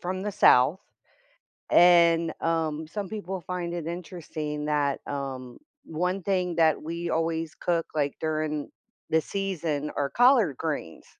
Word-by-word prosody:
from 185 +1 -3
the 210 0 -3
South, 170 -3 +5 0.9
and, 170 -2 +5
um, 160 -1 -1
some 200 +4 -5
people 195 -3 -5
find 175 0 -4
it 170 -2 -4
interesting 160 -3 -5
that, 145 -2 0
um, 135 -3 -5 0.3
one 180 +4 -2
thing 180 -2 0
that 160 -2 +3
we 170 +2 -4
always 165 -1 -1
cook, 170 -2 -1
like, 145 -2 0
during 155 -1 -2 0.4
the 160 - +4
season 165 -6 -3
are 140 -1 -1
collard 240 - +4
greens. 150 - -4
165 Hz, 135 wpm, -27 LUFS, 150-180 Hz, 0.9 s, South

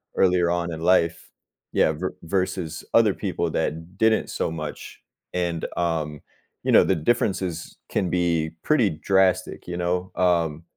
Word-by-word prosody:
earlier 90 -2 +3
on 85 0 -1
in 80 - -6
life. 85 -1 +2 0.4
Yeah, - - +4
ver 90 +5 -4
versus 90 -2 -2
other - - +5
people - - -2
that 80 +4 -3
didn't 110 +1 +2
so - - -2
much, 80 -2 -7 0.3
and 85 -2 -1
um, 80 -4 -1 0.4
you - - +1
know - - +7
the 95 - +2
differences 90 -1 -1
can 90 - 0
be 85 -3 +1
pretty 125 -9 +3
drastic. 95 +4 +1
You 90 - -4
know? 90 +1 -1
Um, 85 -3 +1
85 Hz, 145 wpm, -24 LUFS, 80-95 Hz, 0.4 s, know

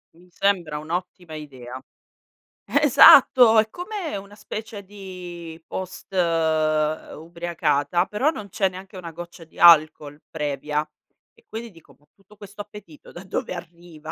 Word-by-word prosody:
Mi 175 +2 -21
sembra 180 -5 0
un'ottima 170 +1 -6
idea. 130 -4 -9 0.8
Esatto! 255 -5 +7
È 220 0 +1
come 355 - -5
una 200 +1 -11
specie 215 0 -8
di 180 -4 -10
post 185 +1 -7
ubriacata, 160 0 0
però 255 +9 +1
non 210 -10 -6
c'è 195 +1 +1
neanche 190 +1 -10
una 170 -2 -8
goccia 170 0 -10
di - - -23
alcol, 155 -3 +5
previa. 150 0 -3 0.5
E 460 - -27
quindi 225 0 -7
dico: 165 -3 -20
"Ma - - -33
tutto 200 +2 -22
questo 205 0 -14
appetito 205 -7 -13
da 175 - -10
dove 185 - -4
arriva? 170 -2 -10
175 Hz, 130 wpm, -23 LUFS, 155-205 Hz, 0.8 s, Esatto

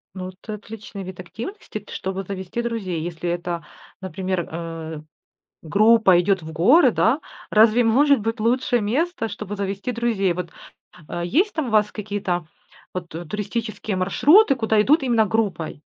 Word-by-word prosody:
Ну 185 -1 -5
это 195 +4 -8
отличный 210 -1 -9
вид 185 -1 -9
активности, 225 - -7
т 205 - -16
чтобы 190 +1 -4
завести 190 +3 -4
друзей. 210 -8 -3
Если 175 +1 -4
это, 175 -2 -3 0.4
например, 185 0 -3
э, 165 -1 -6 0.6
группа 205 +1 +5
идет 190 0 +1
в 160 0 -8
горы, 235 - +5
да? - - +2 0.3
Разве 220 +2 +5
может 275 +4 +4
быть 225 +2 -3
лучше 245 +2 +2
место, 250 +5 -1
чтобы 205 -1 -6
завести 200 +4 -3
друзей? 225 -6 +1
Вот 175 -1 -5 0.7
есть 335 - +1
там 315 -5 -2
у - - -3
вас 210 -1 +3
какие-то 195 -5 -3 0.5
вот 180 -2 -5
туристические 210 +5 -4
маршруты, 280 - +5
куда 220 -3 +2
идут 290 +6 +3
именно 235 -4 +3
группой? 195 -9 -2
205 Hz, 145 wpm, -22 LUFS, 180-230 Hz, 0.7 s, группа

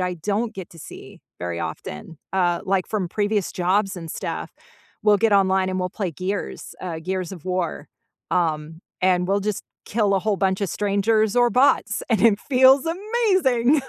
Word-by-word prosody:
I 180 -1 -1
don't 205 +7 -2
get 190 -3 -8
to 165 - -15
see - - -11 0.2
very 85 -1 -4
often, 75 - -7
uh, 175 -2 +1
like, 190 -1 0
from 200 -5 -2
previous 205 0 0
jobs 195 +2 +1
and 165 -2 -7
stuff, - - -5 0.5
we'll 210 -1 +5
get 220 +1 +2
online 190 -1 +3
and 185 0 -2
we'll 180 - -2
play 185 -4 -3
Gears, 185 +4 -4
uh, 170 -3 -5
Gears 185 +1 -3
of 175 -4 -10
War, 180 -5 -2 0.4
um, 160 -2 -1 0.2
and 180 -1 +2
we'll 200 +1 +1
just 210 0 -3 0.2
kill 205 -2 +1
a 195 - +2
whole 210 +1 0
bunch 190 0 0
of 200 - 0
strangers 210 +2 +1
or 245 -1 +4
bots, 260 +4 +3
and 220 -5 +2
it 220 -3 +5
feels 265 +2 +5
amazing! 350 - +2
195 Hz, 175 wpm, -23 LUFS, 180-220 Hz, 0.5 s, we'll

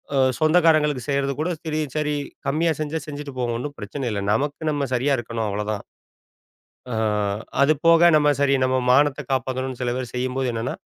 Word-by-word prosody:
அ - - +2 0.2
சொந்தக்காரங்களுக்கு 155 -4 +3
செய்றது 140 0 0
கூட 160 +3 0 0.2
சரி, 155 -1 -1 0.2
சரி 150 -1 0 0.3
கம்மியா 160 +4 +2
செஞ்சா 155 +1 -2
செஞ்சுட்டு 145 -1 -7
போவோம். 120 -2 -1
ஒண்ணும் 145 +4 -5
பிரச்சனை 130 +7 -5
இல்ல. 105 - -2
நமக்கு 145 +6 -1
நம்ம 145 -2 -1
சரியா 135 +3 +2
இருக்கணும் 115 -1 -3
அவ்வளோதான். 105 0 -3 1.1
அ - - -4 0.7
அது 140 +2 +5
போக 165 +1 +7
நம்ம 150 -1 +4
சரி 140 -1 +3
நம்ம 130 0 +2
மானத்தை 145 +2 +3
காப்பாத்துனுன்னு 130 0 -2
சில 125 -1 0
பேர் 125 -2 -5
செய்யும்போது, 130 +1 -1
என்னென்னா 115 +2 -3
140 Hz, 165 wpm, -23 LUFS, 125-150 Hz, 1.1 s, போக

